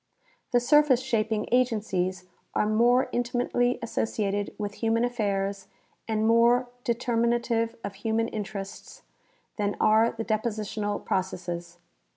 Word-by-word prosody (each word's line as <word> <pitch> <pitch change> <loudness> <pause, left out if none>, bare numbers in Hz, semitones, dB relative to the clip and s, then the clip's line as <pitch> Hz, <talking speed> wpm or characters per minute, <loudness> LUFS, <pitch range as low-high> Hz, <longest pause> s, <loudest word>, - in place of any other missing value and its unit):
The 245 - +4
surface 275 0 +4
shaping 220 -4 -1
agencies 205 -7 0 0.3
are - - +2
more 240 +4 +4
intlmatel}^ 245 0 0
associated 205 -3 -1
with 205 -1 -5
human 230 +1 +2
affairs 200 -4 -2 0.4
and 220 -1 0
more 235 +2 +4
determinative 235 -1 0
of 200 - -4
human 220 +3 -1
interests 205 -3 -7 0.5
than 205 -1 -1
are 220 +2 +4
the 225 0 -5
depositional 215 -1 -2
processes. 175 -2 -3
225 Hz, 110 wpm, -27 LUFS, 205-240 Hz, 0.5 s, The